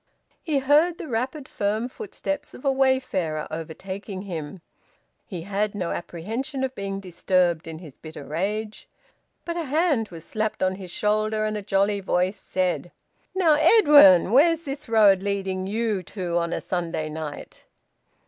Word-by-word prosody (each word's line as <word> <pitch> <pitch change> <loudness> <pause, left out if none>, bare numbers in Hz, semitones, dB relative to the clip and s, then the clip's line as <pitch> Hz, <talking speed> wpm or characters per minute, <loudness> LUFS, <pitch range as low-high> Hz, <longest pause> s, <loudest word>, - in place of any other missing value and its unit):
He 310 -4 0
heard 300 +6 +3
the - - -7
rapid 260 +4 -3
firm 210 +3 -1
footsteps 290 - -5
of 255 - -12
a 275 - +4
wayfarer 260 - 0
overtaking 190 +5 -6
him. 170 -2 -6 0.7
He 180 -6 -6
had 205 +2 -1
no 180 -4 -2
apprehension 230 - -4
of 265 -1 -2
being 195 -3 -4
disturbed 180 -3 0
in 160 -1 -6
his 160 -5 -13
bitter 155 -2 -9
rage. 210 +7 -3 0.6
But 340 0 -3
a 335 - -2
hand 290 -6 +1
was 165 -2 -10
slapped 215 -2 -2
on 185 0 +1
his 185 -2 -9
shoulder, 215 +2 0
and 215 0 -2
a 210 - -3
jolly 200 +1 +1
voice 185 +1 0
said 180 -1 -2 0.4
"Now, 350 -5 +4
Edwin, 295 - +7
where's 325 +6 +4
this 280 -3 -6
road 205 -4 +5
leading 195 -2 -2
you 215 -1 -1
to 180 -1 -5
on 170 0 -2
a - - -2
Sunday 170 -3 -2
night?" 155 -1 -8
200 Hz, 155 wpm, -24 LUFS, 180-260 Hz, 0.7 s, Edwin